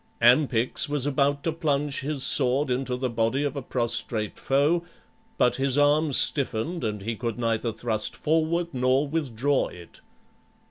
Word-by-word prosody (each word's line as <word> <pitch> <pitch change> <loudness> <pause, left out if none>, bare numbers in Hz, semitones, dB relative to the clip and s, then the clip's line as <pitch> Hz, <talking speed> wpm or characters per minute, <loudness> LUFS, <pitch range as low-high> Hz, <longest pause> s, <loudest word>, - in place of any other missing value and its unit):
Ampyx 125 +2 +3
was 145 -2 -1
about 140 0 +1
to 165 - 0
plunge 145 -3 -1
his 140 -1 -3
sword 135 +1 +2
into 125 0 -1
the 130 +1 -2
body 115 +3 0
of 145 -1 -2
a 140 - -3
prostrate 120 -3 -2
foe, 145 +6 +2 0.5
but 125 - +2
his 135 0 0
arm 145 +1 +3
stiffened 140 +4 0
and 105 -3 -3
he 115 +2 -3
could 115 0 -4
neither 115 -1 -1
thrust 110 -1 -2
forward 165 +2 0
nor 130 +3 +2
withdraw 140 -3 0
it. 85 -1 -13
135 Hz, 150 wpm, -26 LUFS, 120-145 Hz, 0.5 s, Ampyx